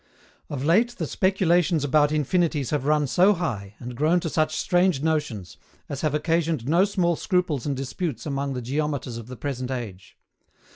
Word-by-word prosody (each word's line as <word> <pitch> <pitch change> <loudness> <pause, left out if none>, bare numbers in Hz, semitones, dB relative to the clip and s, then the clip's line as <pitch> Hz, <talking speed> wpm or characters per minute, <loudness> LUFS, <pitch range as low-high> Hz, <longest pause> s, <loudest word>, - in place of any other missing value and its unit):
Of 140 -1 -4
late 225 +9 +3
the 165 - -2
speculations 175 -3 +2
about 145 +1 +3
Infinities 155 -2 0
have 145 -3 -1
run 150 0 +3
so 185 +9 +4
high, 110 - -4
and 125 0 -8
grown 155 +7 +2
to 165 - -3
such 155 -1 +1
strange 175 -5 +2
notions, 140 - -2 0.3
as 140 - -4
have 150 -2 0
occasioned 160 -4 0
no 170 +6 +4
small 180 -4 +1
scruples 175 - -1
and 140 -2 -1
disputes 135 - -4
among 140 -2 -2
the 125 - -4
geometers 140 -2 -2
of 115 -1 -8
the 125 0 -9
present 130 0 -4
age. 110 -8 -6
150 Hz, 175 wpm, -25 LUFS, 130-170 Hz, 0.3 s, so